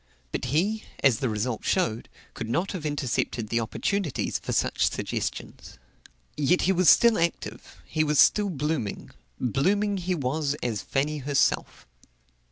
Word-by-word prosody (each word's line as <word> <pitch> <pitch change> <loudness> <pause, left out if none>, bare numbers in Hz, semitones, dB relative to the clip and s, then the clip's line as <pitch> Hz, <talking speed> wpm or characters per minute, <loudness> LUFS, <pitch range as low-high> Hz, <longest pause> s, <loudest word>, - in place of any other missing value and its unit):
But - - -3
he, 190 - 0 0.2
as 130 -5 +4
the 130 - 0
result 110 +2 -2
showed, 120 - 0 0.2
could 115 -2 -6
not 170 +11 0
have 170 -6 -4
intercepted 125 -6 -2
the 115 - +1
opportunities 155 - -2
for - - -5
such - - +1
suggestions. - - -5 0.6
Yet 150 +5 +2
he 190 - +3
was 185 -3 +4
still 235 +3 +6
active; 170 0 -3
he 155 - 0
was 150 -1 +1
still 205 +6 +5
blooming. 150 - -3 0.3
Blooming 200 - +1
he 180 0 -1
was 145 0 -1
as 110 -4 -1
Fanny 150 +2 -1
herself. 140 0 0
150 Hz, 145 wpm, -26 LUFS, 125-180 Hz, 0.6 s, still